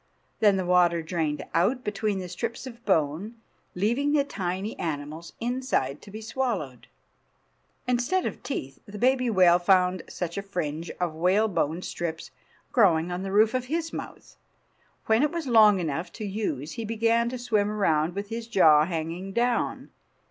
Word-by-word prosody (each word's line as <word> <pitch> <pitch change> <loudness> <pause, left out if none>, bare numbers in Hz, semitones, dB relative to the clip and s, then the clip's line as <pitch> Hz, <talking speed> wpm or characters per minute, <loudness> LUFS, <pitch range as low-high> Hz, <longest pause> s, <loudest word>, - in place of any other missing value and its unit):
Then 205 -3 +4
the 185 - -1
water 175 -2 +3
drained 160 -2 -2
out 240 +9 +2
between 210 0 -1
the 185 -1 -5
strips 230 +7 -5
of 235 -2 -10
bone, 170 +4 0 0.4
leaving 240 +10 +1
the 290 -2 +4
tiny 190 -4 -4
animals 155 +1 -5
inside 240 - -1
to - - -13
be 215 +2 -8
swallowed. 220 - -3 1.0
Instead 250 +10 +1
of - - -4
teeth 135 - -5
the 205 +1 -8
baby 255 +2 +2
whale 180 -4 +5
found 180 0 +3
such 175 +1 -4
a - - -3
fringe 170 -5 -4
of 175 -3 -1
whalebone 180 -1 +1
strips 165 -1 -5 0.4
growing 180 - +3
on 175 +1 -3
the 195 0 -4
roof 215 +2 +4
of 255 -1 -1
his 325 +4 -3
mouth. - - -8 0.7
When 220 +2 +3
it 300 - +3
was 335 -2 -3
long 215 -5 +6
enough 165 0 -3
to 215 - -6
use 190 -8 -3
he 230 - -5
began 230 +1 +1
to 255 - -5
swim 215 -4 0
around 170 -5 +1
with 200 0 -4
his 230 0 -5
jaw 155 -9 +5
hanging 170 +3 -4
down. 240 +1 0
195 Hz, 160 wpm, -26 LUFS, 170-230 Hz, 1.0 s, long